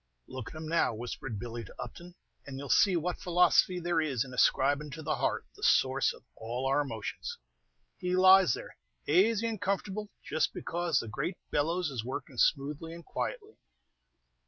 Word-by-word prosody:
"Look 130 -4 -7
at - - -12
him 155 0 -6
now," 165 -7 +2
whispered 120 0 -5
Billy 120 +1 -5
to 95 - -13
Upton, 175 +1 -8 0.3
"and 135 -1 -6
you 140 - -6
'll - - -9
see 195 +6 +5
what 175 +1 -1
philosophy 180 +1 +4
there 170 -1 +1
is 135 -5 0
in 130 - -10
ascribin' 140 +4 +2
to 160 0 -7
the 155 +1 -1
heart - - -1
the - - -16
source - - +3
of - - -14
all 120 +4 -4
our 135 +2 +3
emotions. 310 - -5 0.6
He 180 -1 0
lies 185 -6 +7
there - - -10 0.3
azy 210 +8 +3
and 220 -3 -4
comfortable 200 +1 -2 0.2
just 155 - 0
because 170 -4 -1
the 115 - -5
great 170 - -3
bellows 165 +2 0
is 120 -5 -3
working 130 +1 -6
smoothly 150 +3 +1
and 170 - -12
quietly. 435 -3 -5
160 Hz, 180 wpm, -30 LUFS, 135-180 Hz, 0.6 s, lies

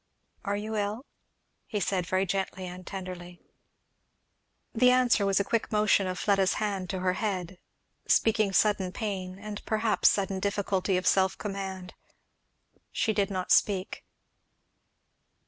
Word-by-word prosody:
"Are 200 0 -1
you 215 +1 -4
ill?" 210 +5 -2 0.6
he 210 - -2
said, 185 -3 -1
very 185 +1 +1
gently 190 0 -3
and 180 0 -9
tenderly. 180 -2 -7 1.3
The 250 +2 +5
answer 250 -5 +3
was 195 0 +3
a - - +2
quick 230 +3 -1
motion 210 -2 +3
of 185 0 -3
Fleda's 195 -1 +2
hand 200 -4 -2
to 190 -1 -3
her 185 0 +1
head, 185 -3 -3 0.5
speaking 215 -3 +3
sudden 190 -2 +2
pain, 190 -5 -4
and 205 +1 -7
perhaps 220 -1 +2
sudden 195 -1 -1
difficulty 195 -1 0
of 185 - -3
self 190 0 +3
command. 190 -3 -5 1.0
She 220 - 0
did 200 -1 +1
not 185 -2 -3
speak. 195 -1 +2
195 Hz, 135 wpm, -28 LUFS, 185-210 Hz, 1.3 s, The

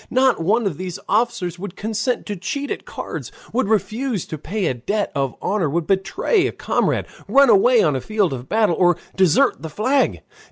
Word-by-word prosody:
Not 260 -5 +3
one 215 +7 +2
of 175 -7 -2
these 185 -2 -4
officers 195 -5 0
would 195 -1 -7
consent 225 +4 -2
to 205 - -4
cheat 275 +10 -4
at - - -4
cards, - - -6 0.2
would 255 -2 +1
refuse 215 +1 -1
to 155 - -6
pay 200 +6 -3
a - - +1
debt 200 - -2
of 135 -4 -1
honor, 190 -6 0
would 165 +3 -1
betray 200 - +1
a - - -3
comrade, - - 0 0.2
run 275 -2 +6
away 460 +3 +5
on - - +2
the - - -2
field 210 -7 0
of 130 0 -7
battle, 215 -5 +2
or 175 -2 +4 0.2
desert 190 - +3
the 160 - -6
flag. 255 - +1
205 Hz, 195 wpm, -21 LUFS, 175-245 Hz, 0.2 s, run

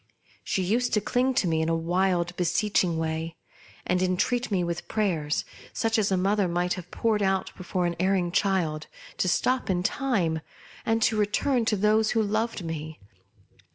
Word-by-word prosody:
She 190 - -1
used 235 +7 0
to - - +4
cling 250 +5 0
to 190 - +2
me 160 -1 +1
in 160 - 0
a 165 - +2
wild, 175 +1 0
beseeching 180 -1 +1
way, 160 +1 -3 0.5
and 180 0 +1
entreat 185 +7 0
me 190 -4 +1
with 170 0 -4
prayers, 165 -8 0 0.3
such 225 0 +1
as 205 -2 +1
a 190 - +3
mother 195 +1 +2
might 175 +1 0
have 180 -1 -8
poured 220 0 0
out 190 -1 0
before 180 -1 -2
an 170 0 -1
erring 185 -1 +1
child, 170 -6 0 0.3
to - - +1
stop 255 +7 +1
in 180 -1 +1
time, 185 - 0 0.5
and 225 -1 +3
return 220 +4 +1
to 220 - +2
those 215 +2 +3
who 220 - +4
loved 215 -2 -1
me. 155 -1 -5
185 Hz, 170 wpm, -26 LUFS, 170-215 Hz, 0.5 s, to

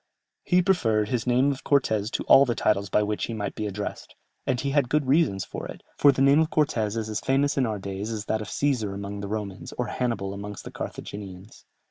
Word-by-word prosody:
"He 180 0 +3
preferred 110 - +2
his 125 -1 -1
name 125 +3 +3
of 135 - -6
Cortès 110 -7 +2
to - - -1
all 135 - +7
the 120 -4 0
titles 100 -2 +1
by 105 - +3
which 105 0 -1
he 115 - -5
might 105 -2 -3
be 105 - -3
addressed, 105 +1 -6 0.3
and 130 -3 +1
he 140 - -1
had 140 -3 +2
good 150 0 +1
reasons 130 - +2
for - - -6
it, - - -10
for 145 - +6
the 135 0 +1
name 140 +2 +6
of 160 0 +2
Cortès 115 -8 0
is 110 -1 -2
as 110 -1 -2
famous 140 +2 +1
in 130 -3 +2
our 110 -1 -2
days 100 +2 -5
as 110 -2 -4
that 110 0 -1
of 105 - -6
Cesar 115 -9 0
amongst 100 0 -5
the 100 - -4
Romans, 100 -2 -5
or 125 - 0
Hannibal 100 -6 -2
amongst 100 +1 -7
the - - -8
Carthaginians." 100 0 -8
110 Hz, 230 wpm, -26 LUFS, 100-135 Hz, 0.3 s, all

